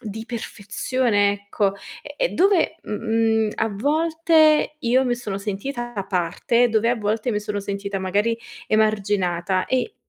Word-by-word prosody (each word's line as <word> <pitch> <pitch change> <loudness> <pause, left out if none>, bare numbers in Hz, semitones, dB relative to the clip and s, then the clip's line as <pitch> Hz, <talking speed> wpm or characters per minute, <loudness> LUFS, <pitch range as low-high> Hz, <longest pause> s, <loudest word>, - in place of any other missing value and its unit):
di 220 -1 -6
perfezione 220 -1 0
ecco. 200 0 -1 0.3
E - - -10
e - - +1
dove, 380 -1 +2
mh - - -7
mhmm, 220 0 +1
a 225 - 0
volte 310 - +2
io 255 0 +2
mi 245 -1 +1
sono 215 -5 -5
sentita 240 +5 -4
da 200 -2 -3
parte, 190 +6 +1
dove 220 +1 +2
a 245 - +2
volte 215 +2 -1
mi 210 -2 -1
sono 210 -1 -3
sentita 200 0 -4
magari 205 +5 0 0.3
emarginata 195 -4 +1
e, 260 - -1
220 Hz, 150 wpm, -22 LUFS, 200-245 Hz, 0.3 s, dove